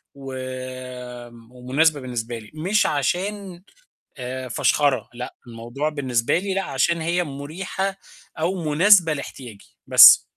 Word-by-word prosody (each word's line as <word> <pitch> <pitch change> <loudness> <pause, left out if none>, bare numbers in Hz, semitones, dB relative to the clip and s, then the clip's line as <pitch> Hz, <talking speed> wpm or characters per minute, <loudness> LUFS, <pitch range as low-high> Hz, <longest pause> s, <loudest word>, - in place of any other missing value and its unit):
وم 130 -3 -8
ومناسبة 135 +5 +1
بالنسبة 120 -2 -5
لي، 110 - -15
مش 180 +7 +1
عشان 185 +5 -2 0.5
آآ 130 0 -5
فَشخَرة، 130 +1 +1
لأ، 125 +1 -7
الموضوع 120 +6 -4
بالنسبة 130 -5 0
لي 195 +2 -2
لأ، 195 0 -1
عشان 165 +5 0
هي 170 +2 0
مُريحة 175 +7 -4 0.4
أو 175 +2 -1
مناسبة 170 +1 +5
لاحتياجي، 125 -7 -10
بس. - - +9
140 Hz, 115 wpm, -22 LUFS, 125-170 Hz, 0.5 s, بس